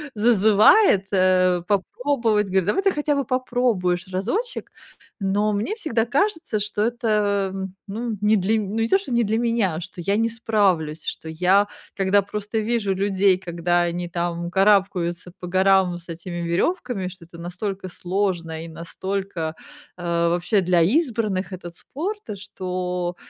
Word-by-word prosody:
зазывает, 215 - +5
э, 185 -2 +3
попробовать, 220 +1 +1
говорит: 190 -1 +1
"Давай 210 - +1
ты 390 - +3
хотя 295 -2 0
бы 280 - -1
попробуешь 235 -8 0
разочек." 245 - -3 0.5
Но 205 +2 +1
мне 215 - -1
всегда 240 - -1
кажется, 310 - 0
что 205 0 -2
это, 210 -4 +1
э, 190 0 -3 0.2
ну, 220 +1 -4
не 210 +1 +4
для 200 +4 +1
м 210 -3 -1
ну, 205 - -4
не 225 - +1
то, 385 - +4
что 390 -10 -5
не 235 0 +3
для 220 +1 0
меня, 230 -8 0
что 185 0 -8
я 200 +4 0
не 230 +1 +2
справлюсь, 195 -9 0
что 160 - -4
я, 185 +5 +3 0.3
когда 195 +1 +3
просто 210 +2 -4
вижу 215 -3 0
людей, 195 -1 +2
когда 175 -1 0
они 175 0 -3
там 170 0 -2
карабкаются 190 -3 +2
по 180 - -7
горам 190 -1 +3
с 170 - -20
этими 175 +1 -6
веревками, 195 - -1
что 180 -2 -11
это 170 0 -14
настолько 185 +3 -5
сложно 175 -3 -2
и - - -8
настолько, 170 0 -4 0.4
э, 175 - -9 0.2
вообще, 175 +4 +1
для 175 -1 +3
избранных 215 - +1
этот 175 -2 -8
спорт, 395 - -5 0.2
что 180 -2 -3
195 Hz, 155 wpm, -23 LUFS, 180-225 Hz, 0.5 s, зазывает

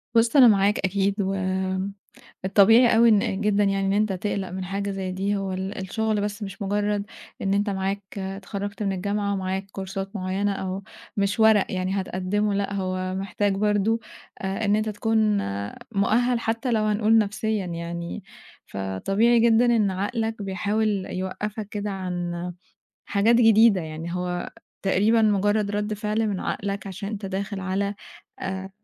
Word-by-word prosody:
بُص، 230 +4 +4
أنا 260 -3 +9
معاك 205 -1 +4
أكيد، 200 +1 0 1.2
والطبيعي 225 +5 +6
أوي 230 +1 +6
إن 210 -2 +2
جدًا 210 -1 +2
يعني، 195 -1 +1
إن 195 - +2
أنت 210 -1 +2
تقلق 195 0 -2
من 185 +1 -5
حاجة 200 +2 -3
زي 190 -1 -3
دي. 195 +2 -1
هو 195 -1 -2
ال 190 +2 -4
الشغل 215 +2 -1
بس 205 +1 -3
مش 195 0 -8
مجرَّد 205 +1 0 0.4
إن 195 0 0
أنت 205 +1 +1
معاك 195 +1 -2 0.2
اتخرَّجت 195 +1 -5
من 195 -1 0
الجامعة 200 +2 -1
ومعاك 190 0 -2
كورسات 195 +1 -5
معيَّنة، 195 +1 -1
أو 190 0 -4 0.3
مش 200 +2 0
ورق 220 -2 +6
يعني 190 +1 -1
هتقدِّمه. 195 +3 -1
لأ، 200 0 -1
هو 185 -1 -2
محتاج 195 +1 -1
برضه 210 +2 +1 0.4
آآ، 195 +3 -2
إن 205 - +3
أنت 215 0 0
تكون 215 0 +1 0.5
مؤهَّل 230 +4 +2
حتى 230 +2 -1
لو 220 -2 +2
هنقول 215 +1 +3
نفسيًا 215 -1 0
يعني. 170 +2 -5 0.4
فطبيعي 195 - +1
جدًا 230 +1 +5
إن 225 -5 +3
عقلك 220 +3 -2
بيحاول 205 0 0
يوقّفك 205 +3 -4
كده 210 0 -3
عن 180 -2 -3 0.7
حاجات 215 +3 +3
جديدة 225 -3 +6
يعني، 160 +1 -6
هو 180 0 -3 0.3
تقريبًا 210 +4 +3
مجرَّد 205 0 +2
رد 210 +1 -1
فعل 210 +1 -1
من 195 -3 -2
عقلك، 200 0 -3
عشان 195 +1 -5
أنت 205 -2 -5
داخل 195 +1 -3
على 195 +2 -1 0.5
آآ، 190 0 -4
200 Hz, 150 wpm, -25 LUFS, 190-215 Hz, 1.2 s, أنا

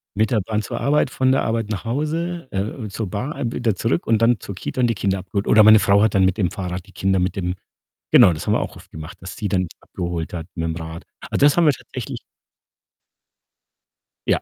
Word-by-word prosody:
mit 110 +1 +1
der 110 -4 +2
Bahn 105 +2 -2
zur 105 - -5
Arbeit, 145 -1 +2
von 130 0 +1
der 135 - +2
Arbeit 115 -1 -1
nach 105 +1 -4
Hause, 155 +5 -2
äh, 95 - -2 0.3
äh, - - -6
zur 105 +1 -4
Bahn, 125 - -3
wieder 115 -5 0
zurück 115 - -1
und 115 -1 +2
dann 115 -1 +4
zur 100 - -8
Kita 125 - -4
und 120 - +4
die 115 - 0
Kinder 95 -1 0
abgeholt. 100 +2 -3
Oder 110 - +7
meine 110 +1 +8
Frau 100 0 +4
hat 110 -1 +2
dann 95 -1 +5
mit 95 +1 +1
dem 95 -5 0
Fahrrad 90 -1 -5
die - - -16
Kinder 95 0 0
mit 90 +1 -1
dem 90 -2 -2 0.6
genau, 90 - +7
das 75 - -6
haben - - +3
wir - - +2
auch - - -5
oft - - -16
gemacht, 80 +2 -9
dass 95 0 -8
sie 105 - -2
dann 95 -2 +1
die - - -18
abgeholt 85 -2 -5
hat 85 -2 -5
mit'm 80 0 -2
Rad. 80 +1 -7 0.2
Also, 140 - +1
das 145 - +5
haben 170 - +5
wir 150 - +5
tatsächlich - - -7 2.1
Ja. - - +2
105 Hz, 235 wpm, -21 LUFS, 90-120 Hz, 2.1 s, meine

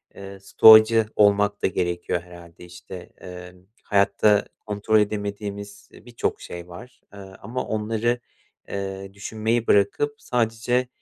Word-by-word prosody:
eee, 100 0 -10
stoacı 110 +3 +6
olmak 105 0 +3
da - - +2
gerekiyor 90 -1 -2
herhâlde, 85 0 -14
işte. 90 +1 -11 0.2
Emm, 90 0 -12 0.2
hayatta 100 +1 +2
kontrol 105 +1 0
edemediğimiz, 100 -1 -4
eee, - - -17
birçok 120 -1 -3
şey 85 0 -9
var, 120 +9 -13
eee, 100 - -11
ama 100 +6 -7
onları, 110 +2 -1 0.5
eee, 95 0 -6
düşünmeyi 110 +3 -2
bırakıp 105 +9 +2
sadece, 120 +1 -1
100 Hz, 120 wpm, -23 LUFS, 95-110 Hz, 0.5 s, stoacı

